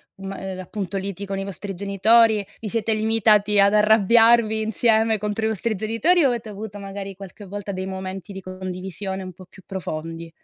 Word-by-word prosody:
uhm, 195 0 -9
ma 195 - -6
e 190 0 -5
l'appunto 190 +1 -5
liti 195 0 -5
con 195 0 -4
i 195 - -4
vostri 195 +1 -6
genitori? 205 +2 +3
Vi 220 - -6
siete 225 0 0
limitati 215 -1 +3
ad 200 +1 +5
arrabbiarvi 220 +1 +5
insieme 220 0 +2
contro 210 +2 -2
i - - +2
vostri 220 +1 -2
genitori 230 - +2
o - - +6
avete 235 -3 -3
avuto 205 0 -7
magari, 195 0 -7
qualche 195 +2 -11
volta, 200 +1 -6
dei 185 0 -4
momenti 190 0 -6
di 195 - -7
condivisione 185 +1 -6
un 185 - -7
po' 185 +1 -14
più 185 +1 -18
profondi? 165 -2 -6
200 Hz, 190 wpm, -22 LUFS, 190-220 Hz, -, o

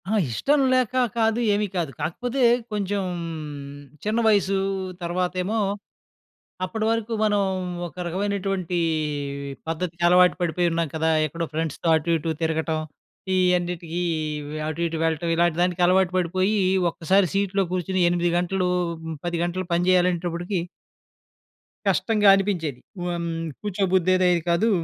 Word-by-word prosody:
ఆ! - - 0 0.2
ఇష్టం 285 - +1
లేకా 255 0 +2 0.2
కాదు, 225 0 +2
ఏమీ 210 +1 +1
కాదు. 165 -6 -1
కాకపోతే, 245 - -1 0.3
కొంచెం 205 -1 -1 1.0
చిన్న 215 +2 0
వయసు. 195 -2 +3 0.5
తర్వాతేమో, 180 +4 -1 1.1
అప్పడవరకు 225 +3 -1
మనం 205 -1 +2 0.5
ఒక 170 - -15
రకమైనటువంటీ 190 -1 -1 0.9
పద్ధతికలవాటు 175 +2 +3
పడిపోయున్నాం 170 -1 0
కదా! 160 0 +1 0.2
ఎక్కడో 165 +3 -4
ఫ్రెండ్స్‌తో 160 +1 -3
అటు 160 +2 -2
ఇటు 160 +1 -2
తిరగటం, 160 0 0 0.6
ఈయన్నిటికీ 180 -2 0 0.5
వ్ - - -7
అటు 155 +2 -4
ఇటు 165 0 -4
వెళ్ళటం, 165 +1 -1
ఇలాంటి 170 -1 +2
దానికి 180 0 +1
అలవాటు 185 0 +3
పడిపోయీ 185 +4 +1 0.3
ఒక్కసారి 185 +3 +2
సీట్‌లో 195 0 +1
కూర్చొని 185 0 0
8 175 0 +1
గంటలు, 180 +1 0 0.6
10 175 -1 -1
గంటలు 185 +2 -3
పని 175 +1 +2
జెయ్యాలనేటప్పటికి... 175 0 +1 1.3
కష్టంగా 210 -2 +2
అనిపించేది. 175 -9 -1 0.2
హ్మ్, 170 -1 -2 0.3
కూర్చోబుద్ధయ్యేదే 185 -2 +2 0.2
కాదు. 170 +7 +3
180 Hz, 110 wpm, -24 LUFS, 170-195 Hz, 1.3 s, వయసు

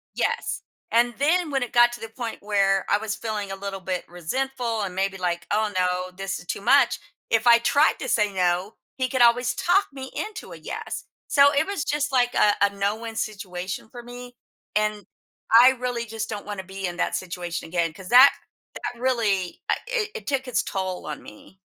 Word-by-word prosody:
Yes, - - -1 0.3
and 240 +1 +3
then 320 +3 +2
when 270 -2 0
it 245 - -4
got 240 0 +6
to 240 - -8
the 225 - -6
point 230 0 -6
where 195 -2 +2
I 205 - +4
was 215 -1 -3
feeling, 210 -3 -4
a - - -4
little 195 -1 -5
bit 185 -1 -3
resentful, 235 +6 -2
and 185 -2 -4
maybe, 195 0 -1
like, 175 -1 -2
"Oh 215 0 +1
no, 180 0 0
this 195 0 -3
is - - -15
too - - -3
much." 250 +3 +4 0.3
If 225 +1 +2
I 235 0 +8
tried 285 +6 +3
to 260 - -4
say 210 -3 +2
"No," 180 +2 0 0.2
he 255 -1 0
could 255 -1 +2
always 240 +1 +4
talk 390 +3 +2
me 265 -1 -8
into 425 0 -6
a - - -8
"Yes." - - -6 0.2
So, 285 0 +6
it 290 +2 +2
was 400 -7 -2
just, 295 -1 -1
like, 245 -2 +2
a 205 -1 +4
a 200 0 +4
no-win 210 +3 -2
situation, 190 -1 -4
for 240 0 -10
me, 245 +1 -10 0.4
and 210 -1 0 0.5
I 245 +3 +9
really 245 -2 -3
just 220 0 -5
don't 205 -2 -6
want 205 -2 -5
to 190 - -6
be 190 0 -5
in 175 0 -4
that - - -1
situation 175 -2 -5
again, 170 -1 0
'cause 185 +2 -11
that 255 +3 +9 0.4
that 240 -1 -6
really, 215 -8 0
uh - - +4
it 455 -4 -1
it 215 - -7
took 270 -1 -1
its 250 - +1
toll 185 -2 -4
on 150 -1 -6
me. 105 - -15
220 Hz, 205 wpm, -24 LUFS, 190-250 Hz, 0.5 s, I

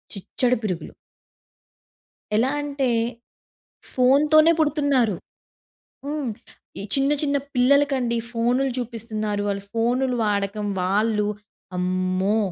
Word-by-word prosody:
చిచ్చడ 240 +5 -1
పిరుగులు. 185 -5 -4 1.4
ఎలా 235 +5 +3
అంటే, 280 -3 -1 1.0
ఫోన్‌తోనే 300 +5 +5
పుడుతున్నారు. 285 - +2 0.9
హ్మ్. 290 -3 -2 0.5
ఈ - - -5
చిన్న 275 +1 +2
చిన్న 285 -1 +1 0.2
పిల్లలకండి 260 -2 +3
ఫోన్‌లు 245 +3 +1
చూపిస్తున్నారు. 220 -3 -3
వాళ్ళు 200 -1 -2
ఫోన్‌‌లు 245 +3 +1
వాడకం 205 0 -1 0.2
వాళ్ళు 210 +3 +1 0.5
అమ్మో! 185 +3 0
240 Hz, 85 wpm, -23 LUFS, 210-275 Hz, 1.4 s, ఫోన్‌తోనే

